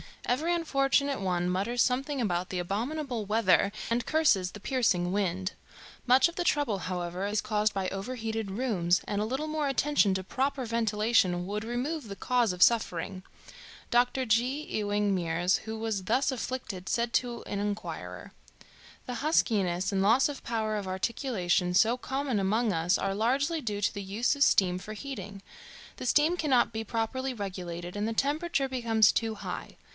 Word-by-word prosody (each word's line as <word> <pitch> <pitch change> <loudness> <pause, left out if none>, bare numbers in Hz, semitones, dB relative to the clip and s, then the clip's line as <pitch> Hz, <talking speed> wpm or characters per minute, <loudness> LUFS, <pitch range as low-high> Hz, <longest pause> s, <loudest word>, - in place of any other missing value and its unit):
Every 315 +8 +1
unfortunate 280 -4 +1
one 180 -2 0
mutters 205 +7 0
something 270 +2 0
about 180 -4 -1
the 185 - -3
abominable 230 - -2
weather 200 -2 +3 0.2
and 235 +1 0
curses 220 - +2
the 210 - -10
piercing 200 -9 +1
wind. 190 -1 -1 0.6
Much 255 +4 +6
of 340 - -13
the 355 - -1
trouble, 275 - +1
however, 180 +1 -3
is 210 +1 0
caused 215 0 0
by 195 -1 -1
overheated 225 +1 -4
rooms, 190 -6 +1
and 205 0 -1
a - - 0
little 265 +7 -2
more 305 -1 -1
attention 275 -6 +2
to 190 0 -2
proper 265 +5 -1
ventilation 215 -5 +1
would 210 +3 -4
remove 255 +4 -3
the 200 - -6
cause 240 -3 +1
of 180 - +4
suffering. 185 -5 +1 0.7
Doctor 245 +2 +2
J. 230 +1 +3 0.2
Ewing 205 -4 0
Mears, 175 0 +1
who 220 0 -4
was 220 -3 -2
thus 255 +6 +2
afflicted, 240 -7 -5
said 235 0 0
to 240 -2 -1
an 200 - -4
inquirer: 205 +1 -5 0.7
"The 250 - -4
huskiness 200 - +1
and 195 -1 +1
loss 230 +8 +4
of 285 - -7
power 220 -2 -1
of 200 -2 -4
articulation 185 -3 0
so 225 +5 +4
common 265 -3 -2
among 215 +4 +1
us 170 +3 +2
are 195 0 -1
largely 270 - +1
due 210 -7 -3
to 205 - +1
the 200 - -5
use 205 +8 0
of 285 - +3
steam 180 -6 +3
for 215 +3 -8
heating. 205 -6 -7 0.6
The - - -6
steam 310 +7 +3
cannot 265 -9 +2
be 220 0 -3
properly 245 +4 -2
regulated, 180 -4 -6
and 210 +1 -1
the 225 - -1
temperature 285 +2 0
becomes 230 -4 +3
too 225 -1 -1
high. - - -6
220 Hz, 170 wpm, -29 LUFS, 195-255 Hz, 0.7 s, Much